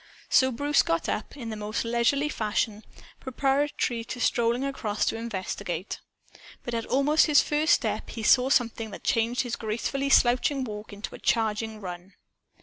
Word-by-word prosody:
So 260 Hz, 0 st, +5 dB
Bruce 285 Hz, +4 st, +2 dB
got 165 Hz, 0 st, -1 dB
up, 225 Hz, -, -4 dB
in 235 Hz, -4 st, -6 dB
the -, -, -4 dB
most 210 Hz, +2 st, -3 dB
leisurely 240 Hz, +5 st, +1 dB
fashion, 215 Hz, -4 st, -2 dB, 0.4 s
preparatory 270 Hz, -2 st, 0 dB
to 245 Hz, -, -6 dB
strolling 240 Hz, +2 st, +1 dB
across 220 Hz, -7 st, -2 dB
to -, -, 0 dB
investigate. 190 Hz, -5 st, -4 dB, 0.6 s
But 240 Hz, -, -5 dB
at 230 Hz, -1 st, -2 dB
almost 295 Hz, +5 st, +3 dB
his 300 Hz, -2 st, +6 dB
first 305 Hz, +2 st, +2 dB
step -, -, -3 dB
he 225 Hz, -, -6 dB
saw 250 Hz, +4 st, +5 dB
something 230 Hz, -4 st, +1 dB
that 200 Hz, -, -10 dB
changed 235 Hz, -1 st, +1 dB
his 245 Hz, -2 st, -3 dB
gracefully 235 Hz, +5 st, -2 dB
slouching 260 Hz, +2 st, +3 dB
walk 210 Hz, -2 st, -7 dB
into 205 Hz, +1 st, -7 dB
a -, -, -9 dB
charging 220 Hz, -1 st, 0 dB
run. 180 Hz, 0 st, -8 dB
235 Hz, 160 wpm, -27 LUFS, 215-270 Hz, 0.6 s, his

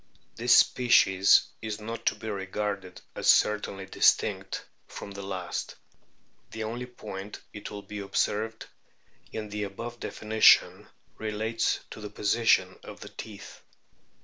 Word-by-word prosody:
This 120 Hz, +2 st, +4 dB
species 100 Hz, -6 st, +5 dB, 0.2 s
is 110 Hz, -1 st, -4 dB
not 115 Hz, +2 st, -6 dB
to -, -, +3 dB
be 110 Hz, -, -9 dB
regarded 100 Hz, -2 st, -4 dB, 0.2 s
as -, -, -3 dB
certainly 105 Hz, -2 st, +3 dB
distinct 95 Hz, -, +1 dB, 0.2 s
from 100 Hz, -, -8 dB
the 100 Hz, 0 st, -7 dB
last. 95 Hz, -3 st, -4 dB, 0.7 s
The 110 Hz, -, -5 dB
only 120 Hz, +3 st, -4 dB
point, 105 Hz, -4 st, -8 dB
it 105 Hz, 0 st, -7 dB
will 100 Hz, -1 st, -8 dB
be 105 Hz, +1 st, -7 dB
observed, 110 Hz, +2 st, -1 dB, 0.7 s
in 110 Hz, -1 st, -5 dB
the 105 Hz, 0 st, -4 dB
above 115 Hz, +4 st, -6 dB
definition 110 Hz, 0 st, +4 dB, 0.3 s
relates 110 Hz, +1 st, -1 dB
to -, -, -9 dB
the 105 Hz, -, -6 dB
position 100 Hz, -3 st, +2 dB
of -, -, -11 dB
the -, -, -8 dB
teeth. -, -, -10 dB
105 Hz, 130 wpm, -28 LUFS, 100-110 Hz, 0.7 s, species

